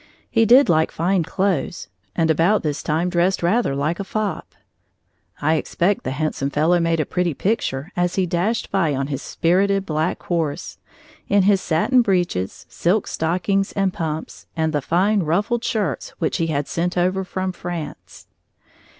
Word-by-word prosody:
He 225 -1 +3
did 260 +5 +7
like 160 -1 +3
fine 180 +3 +1
clothes 180 -2 -1 0.3
and 165 -2 +2
about 170 +7 +2
this 150 -1 -2
time 160 +3 0
dressed 180 +1 +1
rather 180 - +2
like 150 +5 -1
a - - -1
fop. 210 0 -4 0.8
I 155 +2 +2
expect 185 +5 0
the - - -2
handsome 140 0 -2
fellow 160 +5 +2
made 165 -1 +1
a 155 - +1
pretty 175 -4 -1
picture 180 - -1
as 175 0 0
he 190 - +2
dashed 185 +7 -1
by 170 -7 +1
on 135 +1 -1
his 135 - -3
spirited 195 +3 +1
black 155 +1 -1
horse, 165 -5 -2 0.5
in 200 -1 +4
his 195 0 +3
satin 245 +11 +3
breeches, 175 - -1
silk 190 +4 0
stockings 185 +4 -1
and 195 -2 0
pumps, 160 -1 -5
and 160 0 0
the 145 - +1
fine, 195 +8 +2
ruffled 205 +9 0
shirts 220 -6 -2
which 160 - -1
he 165 - 0
had 145 -2 -1
sent 175 +1 -2
over 185 +2 +1
from 185 0 -3
France. 175 -3 -7
175 Hz, 165 wpm, -21 LUFS, 160-195 Hz, 0.8 s, did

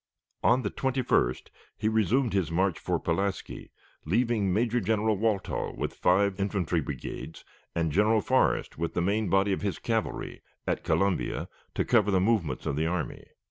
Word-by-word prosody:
On 125 +2 +3
the - - -2
21st 130 - 0 0.3
he 110 - -1
resumed 110 +3 +2
his 95 -5 +1
march 90 +1 +1
for - - -1
Pulaski, 95 +3 -2 0.3
leaving 110 +2 +1
Major 115 +5 +1
General 110 +1 +1
Walthall, 105 -1 -1
with - - -2
five 95 +2 +2
infantry 95 -4 0
brigades, 75 +2 -7 0.3
and 85 -2 0
General 105 +6 +3
Forrest, 130 - +1
with 85 0 -2
the - - +1
main 105 +2 +1
body 95 +2 +3
of - - -3
his 100 -2 -2
cavalry, 115 -2 -3 0.2
at - - -1
Columbia, 100 -2 0 0.3
to - - 0
cover 110 -4 +3
the 95 -2 +3
movements 95 - 0
of - - -1
the 80 +1 +1
army. 85 -1 -3
100 Hz, 160 wpm, -28 LUFS, 90-110 Hz, 0.3 s, On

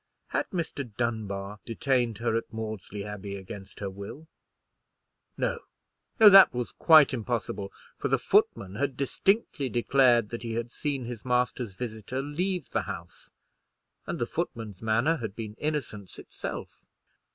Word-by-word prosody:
Had - - -1
Mr. 140 - -4
Dunbar 105 -4 -2
detained 120 -1 0
her 115 0 0
at 115 - -2
Maudesley 110 -2 -5
Abbey 105 -1 -6
against 95 +1 -9
her 100 - -2
will? 100 +11 -9 1.1
No, - - 0 0.6
no, 220 - +10
that 195 -8 +9
was 125 -1 -2
quite 155 -5 +6
impossible; 110 -4 -3 0.3
for - - 0
the - - +3
footman 95 -1 +2
had 140 -1 -1
distinctly 145 - +1
declared 120 -1 +4
that 120 - -5
he 115 -1 -4
had 115 +1 -3
seen 140 -3 -2
his 120 -2 -6
master's 125 -4 0
visitor 115 +2 -4
leave 175 +3 -2
the - - +1
house; 85 0 -8 0.8
and - - -2
the - - 0
footman's 105 -5 -4
manner 115 +9 +2
had 110 -6 -5
been 110 -2 -6
innocence 140 -10 -3
itself. - - -7
115 Hz, 140 wpm, -28 LUFS, 105-135 Hz, 1.1 s, no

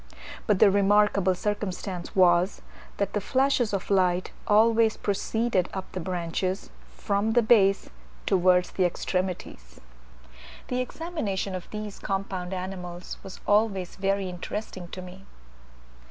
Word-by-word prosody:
But 210 -3 +3
the 200 - +6
remarkable 200 -1 +3
circumstance 190 -2 -4
was, 180 0 +3 0.3
that 200 -1 -1
the 205 - 0
flashes 260 0 +1
of 195 0 -3
light 185 -2 +2 0.2
always 220 +1 +4
proceeded 205 -1 0
up 190 -1 -5
the 185 - -4
branches, 180 +2 -3 0.3
from 205 +2 0
the 240 0 +4
base 200 -3 +4 0.4
towards 180 -1 +3
the 190 - 0
extremities. 180 - -3 0.9
The 250 0 0
examination 250 - -3
of 185 -1 -6
these 210 -1 -6
compound 195 -2 -3
animals 180 -1 -6
was 190 - -10
always 205 -4 +1
very 195 0 0
interesting 185 +1 -6
to 185 +1 -8
me. 185 +2 -12
195 Hz, 125 wpm, -26 LUFS, 180-210 Hz, 0.9 s, the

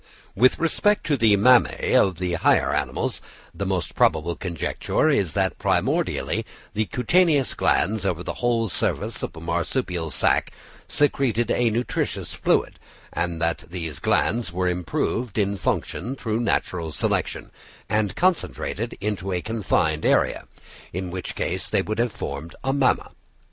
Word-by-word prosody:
With 125 +5 +4
respect 205 +5 +1
to 150 - +2
the 110 -5 +4
mammæ 125 +4 +4
of 95 -2 +4
the 90 -1 -2
higher 85 - +3
animals, - - -2 0.3
the - - -3
most - - -2
probable 80 +2 +2
conjecture 90 - -1
is 100 - +1
that 95 -1 0
primordially - - 0 0.3
the 110 +1 0
cutaneous 140 - +2
glands 105 +3 +1
over 90 -3 -1
the - - -3
whole 120 -2 +2
surface 95 - -1
of - - -5
a - - -8
marsupial 85 +1 -2
sack - - +1 0.3
secreted 125 -5 +1
a 120 -1 +2
nutritious 120 +3 -2
fluid; - - 0 0.3
and 85 -1 -1
that 85 0 -1
these 85 -4 -5
glands 115 -1 +1
were 90 +1 -1
improved 90 +6 -2
in 100 -1 +1
function 105 +5 -2
through 110 -4 -2
natural 90 -8 -1
selection, 75 - -2 0.4
and 105 -3 0
concentrated 165 - -1
into 95 -2 -2
a 90 - 0
confined 90 -7 0
area, - - +2 0.4
in 90 0 -4
which 90 -1 -5
case - - -2
they - - +2
would 110 +1 -3
have 120 -1 +1
formed 70 -2 -6
a 135 0 +1
mamma. 135 -2 +1
100 Hz, 145 wpm, -24 LUFS, 85-120 Hz, 0.4 s, With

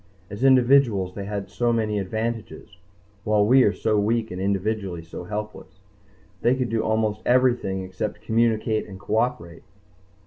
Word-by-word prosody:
As 100 +5 -5
individuals 125 -7 +4
they 100 0 -6
had 100 -1 -4
so 120 +3 0
many 110 -3 0
advantages, 110 +3 -5 0.5
while 105 -1 +2
we 130 +5 +5
are 105 - +4
so 110 0 0
weak 110 +2 0
and 90 +1 -5
individually 100 -2 -2
so 85 +1 -9
helpless. 105 +2 -7 0.6
They 120 +2 +3
could 130 -2 -2
do 115 0 0
almost 110 -1 0
everything 120 -7 +2
except 95 +3 -5
communicate 110 -1 +1
and 95 -2 -10
cooperate. 110 -3 -2
110 Hz, 145 wpm, -24 LUFS, 100-115 Hz, 0.6 s, we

